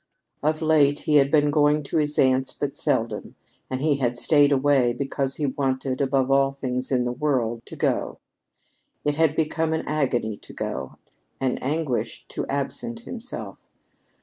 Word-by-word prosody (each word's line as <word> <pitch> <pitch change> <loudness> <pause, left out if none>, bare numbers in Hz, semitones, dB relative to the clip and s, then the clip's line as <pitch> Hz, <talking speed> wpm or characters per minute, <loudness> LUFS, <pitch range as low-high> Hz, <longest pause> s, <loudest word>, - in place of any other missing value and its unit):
Of 155 +2 0
late 150 -2 +4
he 150 -1 +3
had 140 -1 +4
been 150 -1 +3
going 150 0 +3
to 140 - -2
his 150 -1 0
aunt's 130 0 +3
but 145 -1 -3
seldom, - - -1 0.3
and 130 +1 -3
he 150 -3 +2
had 120 -3 -1
stayed 145 +1 +4
away 135 -3 +3
because 135 0 -2
he 150 - -1
wanted, 130 -1 -1
above 135 -1 +1
all 135 0 +4
things 130 -2 -3
in 125 -2 +2
the 120 - -1
world, 120 -4 -1
to - - -9
go. - - -1 0.9
It 145 - +2
had 155 0 +2
become 160 0 0
an 160 - -1
agony 125 -8 0
to - - -14
go - - -4 0.4
an 130 -2 0
anguish 145 -2 -2
to - - -4
absent 230 - -3
himself. 245 +1 -7
140 Hz, 165 wpm, -24 LUFS, 130-150 Hz, 0.9 s, late